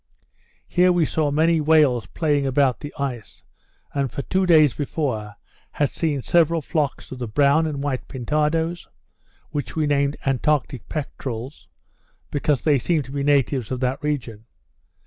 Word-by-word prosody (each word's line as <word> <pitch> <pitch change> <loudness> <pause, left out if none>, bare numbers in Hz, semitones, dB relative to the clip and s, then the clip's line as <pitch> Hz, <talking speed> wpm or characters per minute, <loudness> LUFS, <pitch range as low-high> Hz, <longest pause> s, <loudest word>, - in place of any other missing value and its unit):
Here 180 +1 +3
we 175 -2 +2
saw 150 0 0
many 160 +2 +2
whales 145 -9 +3
playing 145 -4 0
about 130 -3 +2
the 145 - -7
ice, 130 -6 -5 0.5
and 140 -3 -1
for 140 - -4
two 190 0 0
days 155 -6 +6
before 130 -8 -3 0.4
had 145 -2 0
seen 145 -5 -1
several 170 -1 +3
flocks 150 -3 -2
of 130 - -7
the 120 - -3
brown 145 +7 +3
and 140 -2 -4
white 135 -3 -3
pintadoes, 155 +6 -1 0.6
which 145 -2 -4
we 155 -1 +1
named 140 0 +1
Antarctic 135 -1 0
peterels, 135 -3 -6 0.6
because 145 -1 0
they 145 -3 +3
seem 155 +4 0
to 135 - -12
be 140 0 -2
natives 140 -4 +1
of 130 - -3
that 130 +4 -1
region. 120 -7 -3
145 Hz, 150 wpm, -23 LUFS, 130-155 Hz, 0.6 s, days